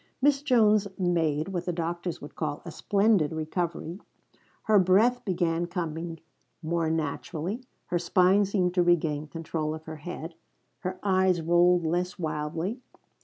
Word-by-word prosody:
Miss 280 0 +3
Jones 215 -7 +4
made 165 -3 +1
what 180 -2 -3
the - - +1
doctors 170 +1 -3
would 145 - -9
call 150 -2 -3
a 170 - -6
splendid 200 -4 +2
recovery. 165 +2 -3 0.6
Her 215 -2 +5
breath 210 +7 +4
began 175 -3 0
coming 165 -2 -4 0.4
more 165 0 0
naturally; 160 - -3 0.3
her 175 - +1
spine 185 +3 +4
seemed 185 -3 0
to 180 - +3
regain 160 -4 +1
control 155 -1 -3
of 160 - -10
her 160 0 -8
head; 165 +1 -7 0.5
her 185 0 -4
eyes 190 -2 +3
rolled 175 +1 +4
less 180 +3 -1
wildly. 160 +6 -3
175 Hz, 140 wpm, -27 LUFS, 160-190 Hz, 0.6 s, Her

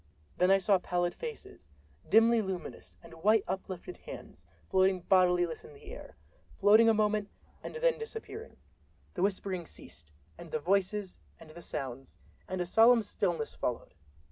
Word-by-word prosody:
Then 180 - +3
I 195 - +6
saw 195 0 +3
pallid 175 0 -1
faces, 455 - -9 0.4
dimly 225 +1 +5
luminous, 190 -3 -7
and 165 - -13
white 215 +2 +4
uplifted 185 -1 -5
hands, 85 - -11 0.2
floating 190 -1 +2
bodiless 180 -2 +2
in 460 -1 -14
the 425 0 -12
air—floating 220 - +1
a - - +5
moment 210 -1 +1 0.3
and - - -8
then - - +1
disappearing. 450 0 -8 0.6
The 175 - -4
whispering 190 -3 -1
ceased, 75 -3 -14 0.3
and 170 - -10
the 155 - -1
voices 195 +4 -1 0.2
and 155 - -13
the 170 - -11
sounds, 135 -4 -6 0.3
and 185 - -4
a - - -1
solemn 225 +5 +5
stillness 175 -7 -2
followed. 125 - -4
190 Hz, 145 wpm, -31 LUFS, 175-220 Hz, 0.6 s, I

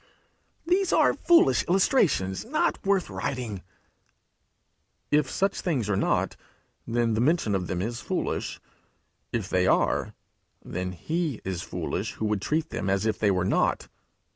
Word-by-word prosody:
'These 365 +2 +2
are - - +4
foolish 345 +1 +4
illustrations 175 - +2
not 310 +8 0
worth 195 -2 +2
writing!' 120 -8 -4 1.5
If 150 -2 +3
such 195 +6 0
things 130 - -1
are - - +2
not, 95 - 0 0.5
then 115 -1 +1
the 110 - +1
mention 145 -6 +2
of 95 -2 -1
them 90 0 -2
is 115 +1 -4
foolish. - - -3 0.7
If - - -2
they 90 0 +1
are, - - +1 0.5
then 90 +1 -4
he 155 - -2
is 95 -2 -3
foolish - - -4
who 110 - -4
would 105 -2 0
treat 160 +7 -1
them 95 - -2
as 100 +2 +1
if 110 -2 0
they 105 - +3
were 90 -2 +1
not. - - +1
115 Hz, 145 wpm, -26 LUFS, -, 1.5 s, are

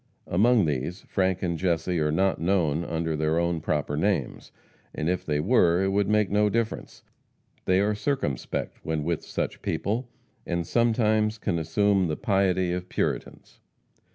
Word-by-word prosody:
Among 110 +3 +3
these, 75 +5 -2
Frank 95 -1 -1
and 85 -3 -1
Jesse 90 -1 0
are 75 -1 +1
not 95 +3 +1
known 85 -3 +1
under 80 -1 -2
their 80 +1 0
own 85 -1 0
proper 75 -1 -1
names, 80 -4 -1 0.4
and 75 - -2
if 90 0 0
they 75 -1 -1
were 90 -1 +3
it 95 - +1
would 100 0 +1
make 105 -2 +2
no 105 +1 +3
difference. 115 +1 -3 0.6
They 95 0 +3
are 105 +1 +1
circumspect 105 - -3
when 80 -2 -2
with 85 0 -2
such - - -4
people, 115 +5 -2 0.3
and 85 -1 -2
sometimes 110 -1 +2
can 85 -5 -1
assume 95 +3 +2
the 75 - -2
piety 95 -3 +1
of 90 0 -5
Puritans. - - -3
90 Hz, 155 wpm, -26 LUFS, 80-105 Hz, 0.6 s, Among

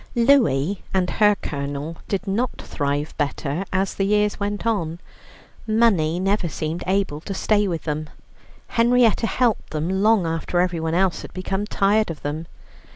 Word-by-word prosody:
Louie 205 - +3
and 185 -1 +2
her 210 -1 +4
Colonel 145 +2 -4
did 195 -1 -2
not 220 +6 -1
thrive 145 +1 -2
better 145 +3 -1
as 190 0 0
the 195 - -1
years 210 +1 +1
went 205 +1 -3
on. 170 -7 -1 0.7
Money 200 -8 +3
never 195 -1 0
seemed 155 +3 -3
able 190 -6 0
to 195 - -5
stay 205 +1 +2
with 170 -3 -3
them. 155 -1 -3 0.6
Henrietta 235 -1 +3
helped 245 -2 0
them 170 +5 -1
long 215 -3 +4
after 165 +2 -1
everyone 170 -2 0
else 185 -1 +1
had - - -9
become 195 +2 -2
tired 210 +1 +2
of 165 - -7
them. 155 +3 -4
190 Hz, 155 wpm, -22 LUFS, 160-210 Hz, 0.7 s, her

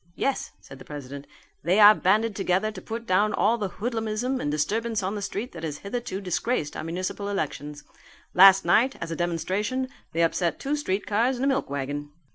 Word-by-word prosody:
"Yes," 275 - -2
said 135 - -13
the - - -10
president, 140 -1 -8 0.3
"they 180 +6 +2
are 210 0 +10
banded 215 +2 +2
together 195 +2 0
to 190 -3 -9
put 230 +4 -6
down 210 +1 +2
all 230 +3 +2
the 200 -3 -2
hoodlumism 225 +4 -2
and 145 - -1
disturbance 215 +9 -1
on 190 +2 -1
the 210 - -4
street 210 +5 -4
that - - -9
has 150 -2 -3
hitherto 200 0 -4
disgraced 190 -3 -2
our - - -4
municipal 185 +4 -3
elections. 150 -5 -4 0.5
Last 195 0 +8
night, 235 +10 +3
as 165 - -5
a - - -2
demonstration, 190 +10 -1 0.2
they 165 +1 +2
upset 170 0 0
two 285 +2 -1
streetcars 225 -1 0
and 250 +2 -2
a - - +3
milk 275 0 0
wagon." 145 +1 -4
200 Hz, 190 wpm, -26 LUFS, 165-225 Hz, 0.5 s, are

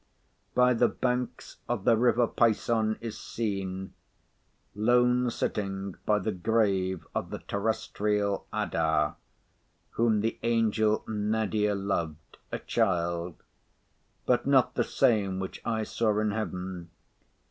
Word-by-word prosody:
By 125 0 +5
the 120 0 +4
banks 125 -1 -3
of 120 -5 -1
the 115 - +5
river 120 +1 +3
Pison 110 -1 +1
is 115 -2 -6
seen, 95 -4 -4 0.8
lone 125 +3 +3
sitting 100 -4 -3
by 105 - +4
the 105 +2 -1
grave 95 -2 0
of - - -2
the - - -4
terrestrial 105 -1 -1
Adah, 80 -2 +1 0.8
whom 110 -2 +2
the 115 +1 -2
angel 110 -2 +2
Nadir 105 -1 0
loved, 85 -6 -3
a - - -1
Child; 85 -5 -1 0.8
but - - +2
not - - +4
the - - +1
same 100 -5 +2
which 95 - -5
I 110 -1 -1
saw 110 -1 0
in 105 0 +1
heaven. 90 -4 -4
105 Hz, 115 wpm, -28 LUFS, 95-115 Hz, 0.8 s, By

